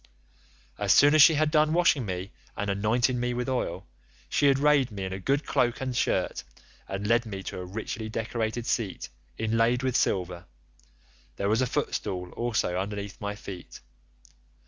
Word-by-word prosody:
As - - +2
soon 145 +1 +7
as 155 - +7
she 160 +2 +8
had 155 0 +2
done 155 0 +3
washing 165 -8 +3
me 95 +1 -4 0.3
and 100 0 -1
anointing 120 +5 +1
me 125 0 -1
with 125 +1 -2
oil, 100 -8 -2 0.4
she 140 -1 +4
arrayed 140 -1 +3
me 100 -3 -6
in 95 0 -4
a 95 - -5
good 140 +9 0
cloak 120 -1 +1
and 130 -2 -3
shirt - - 0 0.4
and 95 +1 -4
led 115 +2 +3
me 95 -2 -6
to - - -6
a 90 - -5
richly 110 +3 -5
decorated 115 +1 -3
seat 110 -7 -2 0.3
inlaid 115 +3 +1
with 130 -2 0
silver; 90 -4 0 0.9
there 100 - -1
was 110 +4 +2
a 130 - +2
footstool 90 -6 -3
also 110 -6 -1
under 100 +2 -3 0.2
my 105 0 -4
feet. 95 -3 -9
115 Hz, 170 wpm, -27 LUFS, 100-130 Hz, 0.9 s, she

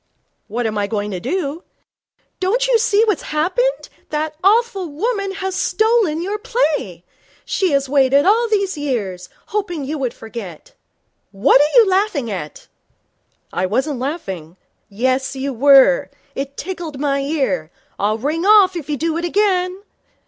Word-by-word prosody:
'What 235 +3 -3
am 215 -1 -1
I 200 - 0
going 205 -1 -3
to 185 - -4
do?' 310 - -3 0.8
'Don't 465 +7 +1
you - - +3
see 440 -2 +3
what's 420 -6 0
happened? - - -1 0.2
That 310 0 -2
awful 405 -2 +2
woman 400 +6 -2
has 380 -1 -3
stolen 425 -4 +1
your 410 +3 -3
play. 300 - -1 0.4
She 380 - 0
has 275 -1 +1
waited 275 +1 +3
all 450 +5 +4
these 400 -3 0
years, 205 -11 -3 0.2
hoping 350 -8 -3
you 300 +2 -4
would 255 -3 -2
forget. 225 - -9 0.6
What 200 +7 +4
are 300 +11 +5
you 450 - +5
laughing 375 - 0
at?' 165 -6 -7 0.9
'I 185 +1 0
wasn't 260 +6 -1
laughing.' 195 - -5 0.3
'Yes, 260 +5 -1
you 270 +1 -3
were. 275 - +5 0.2
It 275 +1 -5
tickled 340 -5 -6
my 280 -1 0
ear. 265 - -1 0.3
I'll 210 +2 +1
ring 300 +8 -2
off 400 -2 +6
if 310 -4 -6
you 295 - -1
do 325 +3 -1
it 340 - -3
again. 370 0 0
300 Hz, 150 wpm, -19 LUFS, 255-390 Hz, 0.9 s, off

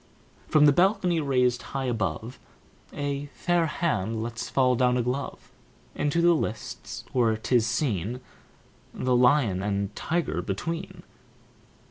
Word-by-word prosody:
From 150 -1 +5
the 145 - +7
balcony 180 +1 +2
raised 125 -4 +1 0.2
high 135 - -2
above 110 -1 -3 0.5
A 145 0 -3
fair 175 -2 +1
hand 115 - -1
lets 115 0 -5
fall 130 -2 +3
down 125 0 +2
a 125 - +1
glove 130 +3 -4 0.4
Into 145 +4 0
the 175 0 +6
lists, 115 -8 -4
where 115 -4 +2
'tis 115 0 +1
seen 120 - -1 0.8
The 125 -1 +1
lion 125 -6 +3
and 100 0 -2
tiger 155 - -1
between. 165 - -5
125 Hz, 125 wpm, -26 LUFS, 110-150 Hz, 0.8 s, the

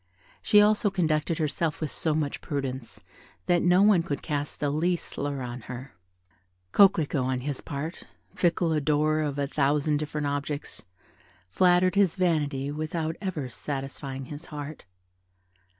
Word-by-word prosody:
She 210 - +6
also 210 0 +3
conducted 160 -4 0
herself 155 0 -1
with 155 -3 -2
so 155 -2 -1
much 150 -2 -2
prudence 135 -4 -4 0.4
that 175 -1 +3
no 180 +2 +5
one 205 -4 +5
could 145 -4 -4
cast 145 -1 -3
the 145 -1 0
least 170 +4 0
slur 140 -1 -4
on 120 0 -6
her. 125 +2 -7 0.8
Coquelicot, 160 - +4
on 130 0 -1
his 140 0 -3
part 150 +4 -5 0.3
"fickle 170 -1 +1
adorer 155 +1 +2
of 145 -2 -2
a 140 - +1
thousand 145 +1 +1
different 150 0 -3
objects" 145 +1 -3 0.7
flattered 180 - +4
his 200 -4 +3
vanity 150 -6 0
without 155 +1 -3
ever 170 -9 -3
satisfying 135 0 -5
his 150 +5 -9
heart. 150 -3 -7
150 Hz, 140 wpm, -27 LUFS, 140-170 Hz, 0.8 s, She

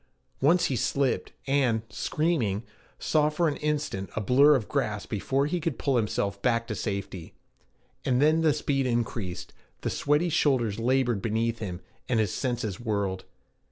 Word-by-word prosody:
Once 165 +6 +4
he 135 - 0
slipped, 130 +3 0
and, 130 -5 +2
screaming, 115 - 0 0.3
saw 150 -1 +2
for 165 +3 +1
an 150 - -1
instant 150 -10 -2
a - - 0
blur 135 +8 +5
of 115 -6 -1
grass 110 -8 -1
before 135 +6 0
he 175 +4 -1
could 160 -6 -2
pull 140 -2 0
himself 100 -3 -1
back 115 -2 +1
to 115 - -4
safety. 100 -4 -5 0.7
And 125 -1 +1
then 155 +3 +4
the 160 -2 +4
speed 140 -2 0
increased, 115 -6 -3 0.3
the - - -2
sweaty 150 +4 +1
shoulders 120 -9 +1
labored 120 -3 +1
beneath 115 +1 -1
him, 90 -4 -5 0.3
and 120 -3 +2
his 105 -4 0
senses 120 -7 -2
whirled. 100 -5 -2
125 Hz, 160 wpm, -27 LUFS, 105-145 Hz, 0.7 s, blur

